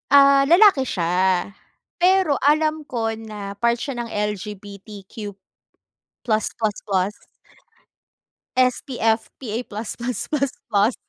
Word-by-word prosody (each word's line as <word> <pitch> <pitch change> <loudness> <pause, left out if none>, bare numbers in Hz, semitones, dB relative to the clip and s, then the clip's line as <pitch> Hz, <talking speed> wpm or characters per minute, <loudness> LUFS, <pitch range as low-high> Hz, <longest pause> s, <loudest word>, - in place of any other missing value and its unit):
ah, 275 0 +7
lalaki 345 -4 +6
siya. 180 0 +1 0.5
Pero 360 -5 +3
alam 310 +2 +2
ko 230 -3 -1
na 210 -3 -7
part 235 +1 +3
siya 270 -1 -4
ng 240 - -2
L-G-B-T-Q 205 0 -6 0.9
plus 220 -2 +1
plus 215 -2 0
plus. 195 -1 +1 1.4
SPF 245 -3 +1
PA 235 -2 -3
plus 215 +1 -6
plus 245 +1 -4
plus 275 -3 0 0.2
plus. 210 +3 +3
225 Hz, 110 wpm, -22 LUFS, 205-275 Hz, 1.4 s, ah